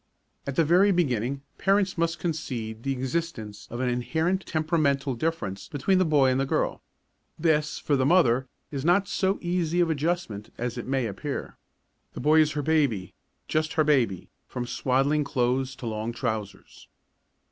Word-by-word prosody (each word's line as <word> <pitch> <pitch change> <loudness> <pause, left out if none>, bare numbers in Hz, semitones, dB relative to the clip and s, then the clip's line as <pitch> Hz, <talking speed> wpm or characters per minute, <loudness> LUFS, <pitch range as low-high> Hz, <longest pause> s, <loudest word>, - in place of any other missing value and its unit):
At 140 - -3
the 165 - +4
very 185 +6 +5
beginning 135 - 0 0.2
parents 195 -1 +2
must 165 -1 0
concede 125 -10 -4
the 135 - -2
existence 130 -5 -3
of 120 +2 -4
an 130 - +1
inherent 160 +10 0
temperamental 155 -4 +1
difference 120 -8 -3
between 170 +7 +1
the 185 - +3
boy 145 -4 +4
and 130 - +1
the 135 - +1
girl. - - 0 0.6
This, 155 -2 +1
for 145 - 0
the 130 - +2
mother, 130 -5 +4 0.2
is 140 -2 -4
not 180 +5 +3
so 190 +1 0
easy 175 -1 0
of 170 -2 +3
adjustment 150 - -2
as 120 0 -3
it - - -6
may 130 -2 0
appear. 115 +7 -5 0.6
The - - -7
boy 155 +1 +4
is 155 -1 +1
her 145 -1 -2
baby, 135 - +1 0.3
just 155 0 0
her 160 -3 +3
baby, 125 - +1 0.2
from 125 -1 -4
swaddling 135 +4 +1
clothes 130 -1 0
to 125 - -9
long 110 +1 -3
trousers. 110 -5 -5
140 Hz, 165 wpm, -26 LUFS, 125-165 Hz, 0.6 s, very